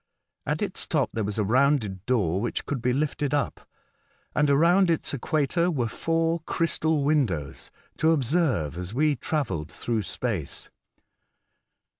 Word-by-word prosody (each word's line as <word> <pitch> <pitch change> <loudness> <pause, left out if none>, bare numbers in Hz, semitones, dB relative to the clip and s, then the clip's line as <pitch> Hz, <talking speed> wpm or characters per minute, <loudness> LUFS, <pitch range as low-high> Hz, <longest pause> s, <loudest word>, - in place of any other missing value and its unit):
At - - 0
its - - -3
top - - +1
there 110 - -1
was 105 +1 -3
a 105 - +2
rounded 115 -4 +1
door 100 -8 +1
which 120 - -3
could 135 -4 -3
be 125 - +1
lifted 145 +1 0
up, 145 - -3 0.6
and 150 -1 +2
around 170 +6 +4
its 165 -3 0
equator 155 +5 +1
were 130 -9 0
four 165 +6 0
crystal 160 -3 +1
windows, 115 - 0 0.3
to 160 - +3
observe 130 - +1
as 90 +5 -5
we 150 +1 +3
travelled 120 - -2
through 115 -2 -2
space. 105 - -4
140 Hz, 140 wpm, -26 LUFS, 105-155 Hz, 0.6 s, around